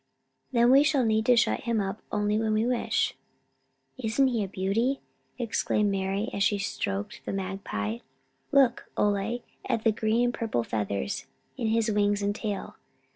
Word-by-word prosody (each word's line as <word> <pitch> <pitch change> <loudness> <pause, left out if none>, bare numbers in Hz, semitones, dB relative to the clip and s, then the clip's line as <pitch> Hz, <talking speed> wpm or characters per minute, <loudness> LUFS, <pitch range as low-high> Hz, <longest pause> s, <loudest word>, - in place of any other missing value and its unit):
"Then 240 -1 +4
we 270 +1 +8
shall 290 -4 +3
need 220 0 +1
to 250 - +7
shut 235 - +2
him 230 -2 +1
up 195 +1 -3
only 210 0 +1
when 220 -1 +1
we 215 +1 +2
wish." 245 -1 +1 0.9
"Isn't 260 +3 +2
he 230 -4 0
a - - -3
beauty," 205 +8 0 0.4
exclaimed 210 -3 +1
Mari, 195 +4 -1
as 200 - -3
she 205 +1 +3
stroked 200 +1 -3
the - - -4
magpie. 185 - -3 0.5
"Look, 270 -4 +3
Ole, 210 +4 0 0.2
at 230 -4 -1
the 225 - +4
green 220 +2 +1
and 245 0 +1
purple 220 - -1
feathers 100 -10 -2 0.3
in 235 -4 -2
his 225 0 +2
wings 205 0 +2
and 200 0 +1
tail. 205 -2 -4
215 Hz, 165 wpm, -28 LUFS, 200-235 Hz, 0.9 s, we